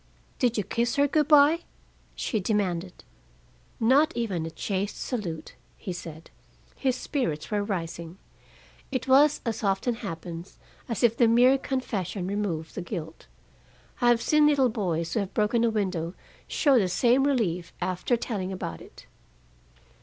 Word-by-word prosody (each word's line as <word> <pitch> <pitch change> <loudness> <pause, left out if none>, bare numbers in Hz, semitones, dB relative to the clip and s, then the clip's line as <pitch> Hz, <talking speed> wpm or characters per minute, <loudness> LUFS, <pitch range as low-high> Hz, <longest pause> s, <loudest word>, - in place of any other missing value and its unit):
"Did 240 -2 +2
you 210 - +1
kiss 235 +5 -1
her 285 0 +4
good 300 0 +2
by?" 300 +2 +6 0.6
she 220 - -1
demanded. 185 -3 -2 0.8
"Not 275 +8 +4
even 190 -9 -1
a - - -4
chaste 195 +4 -3
salute," 175 - -4 0.2
he 185 - -5
said. 165 -2 -9 0.4
His 260 -2 0
spirits 230 - -3
were 205 -1 +1
rising. 170 -3 -5 0.7
It 260 -1 -2
was, 280 +3 +5
as 225 -1 -3
often 195 +5 +1
happens, 170 -5 -7 0.3
as 230 - -2
if 230 -1 +4
the 235 0 +4
mere 245 +4 +6
confession 215 -9 -3
removed 185 -5 -3
the - - -4
guilt. 165 -3 -7 0.7
I 245 - +4
have 240 -1 +4
seen 305 -1 +4
little 275 -4 +4
boys 170 -7 -2
who - - +1
have 195 -2 -4
broken 215 +2 +2
a 235 - +4
window 185 -6 -2 0.3
show 275 -5 +3
the 195 - +2
same 245 +7 +3
relief 190 -12 0
after 185 +7 0
telling 195 -5 -3
about 180 -3 -5
it. - - -14
210 Hz, 150 wpm, -27 LUFS, 180-250 Hz, 0.8 s, by